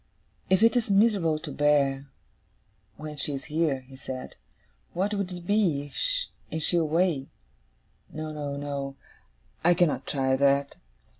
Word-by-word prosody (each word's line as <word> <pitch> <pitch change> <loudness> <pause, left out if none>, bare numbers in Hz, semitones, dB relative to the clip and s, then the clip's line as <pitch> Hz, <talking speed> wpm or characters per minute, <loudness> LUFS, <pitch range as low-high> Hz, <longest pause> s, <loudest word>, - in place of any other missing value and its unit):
'If 190 +3 +4
it 230 0 +5
is 235 -3 +1
miserable 195 -6 +3
to 155 -1 -7
bear, 140 -2 +2 0.9
when 150 0 -7
she 140 +1 -1
is 135 - -6
here,' 155 -4 0
he 130 +1 -15
said, 130 -1 -7 0.6
'what 195 +4 0
would 200 -2 -2
it 175 -1 -7
be, 170 -9 +1 0.6
and 160 -1 -3
she 175 - +2
away? 160 -3 +1 0.8
No, 155 0 -5
no, 145 -2 -4
no. 140 -1 -4 0.7
I 175 +1 +5
cannot 175 -4 +1
try 130 -2 +1
that. 140 +1 +2
150 Hz, 140 wpm, -27 LUFS, 140-175 Hz, 0.9 s, it